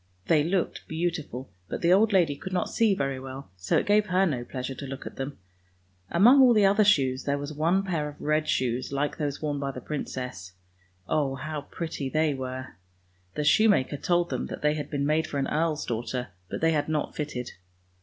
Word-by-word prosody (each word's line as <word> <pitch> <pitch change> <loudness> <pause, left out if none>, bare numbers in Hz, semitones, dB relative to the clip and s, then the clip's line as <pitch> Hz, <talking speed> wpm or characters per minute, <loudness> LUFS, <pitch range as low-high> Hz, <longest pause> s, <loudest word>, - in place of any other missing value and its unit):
They 150 +4 +4
looked 180 +3 -1
beautiful, 160 -6 -3 0.2
but - - -4
the 170 +1 +5
old 215 +3 +4
lady 170 -7 +3
could 190 +6 -7
not 180 - -1
see 220 -4 +3
very 135 -4 -2
well, 130 -4 -8
so 90 0 0
it - - +1
gave 210 +1 +3
her 185 +1 +3
no 130 -9 -1
pleasure 130 +1 -5
to 140 +1 -7
look 135 0 -7
at - - -7
them. 135 +1 -5 0.7
Among 240 +10 +6
all 250 -3 +7
the 210 -2 +5
other 200 +2 +5
shoes 135 -10 +3
there 140 0 +1
was 145 +2 -5
one 170 +6 +2
pair 165 -6 -2
of 145 - -13
red 155 +1 +1
shoes 125 0 0
like 140 +1 -1
those 145 -1 -3
worn 145 -2 -1
by 140 -1 -2
the 130 - -6
princess; 125 -10 -5 0.5
oh, 140 -3 +1
how 150 +2 -4
pretty 160 -5 -4
they 155 +1 +2
were. 130 -5 -6 0.6
The 150 - -1
shoemaker 175 -4 +4
told 175 +4 +1
them - - -2
that - - -7
they 150 0 +3
had 150 -1 -4
been 140 -2 -1
made 155 +2 +1
for 145 - -4
an 135 - 0
earl's 155 0 0
daughter, 120 +1 -3 0.2
but - - -4
they 165 0 +4
had 150 -1 0
not 155 -2 -1
fitted. 135 -5 -4
150 Hz, 210 wpm, -27 LUFS, 135-170 Hz, 0.7 s, all